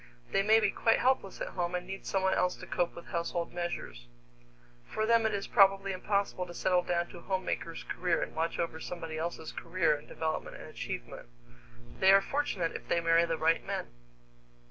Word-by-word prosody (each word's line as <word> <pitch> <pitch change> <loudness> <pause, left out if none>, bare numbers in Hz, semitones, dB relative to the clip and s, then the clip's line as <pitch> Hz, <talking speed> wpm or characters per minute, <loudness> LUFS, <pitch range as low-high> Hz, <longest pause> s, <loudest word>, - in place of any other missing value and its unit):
They - - +3
may 215 +2 +6
be 215 -3 +2
quite 225 - +3
helpless 255 -7 +1
at - - -2
home 175 0 -2
and 180 0 -3
need 195 +1 -7
someone 190 -1 +2
else 180 - +1
to - - -10
cope 175 -1 -1
with 170 - -9
household 170 0 -3
measures. 115 - -4 0.8
For 215 - -2
them 230 0 +4
it 215 - -2
is 200 - -3
probably 195 -1 +4
impossible 195 -1 -1
to 175 - -9
settle 180 0 +2
down 175 -1 -1
to 175 - -10
a - - -14
homemaker's 185 -3 -3
career 175 -1 0
and - - -6
watch 165 +1 -1
over 165 -1 -2
somebody 165 -2 -5
else's 160 -1 -4
career 165 -2 +1
and 145 - -11
development 160 -1 -3
and - - -10
achievement. - - -6 0.7
They 190 - +7
are 195 - +8
fortunate 195 - -1
if - - -7
they 170 - +2
marry 165 0 +4
the 165 -1 -1
right 160 +1 +2
men! - - -4
180 Hz, 195 wpm, -31 LUFS, 165-195 Hz, 0.8 s, are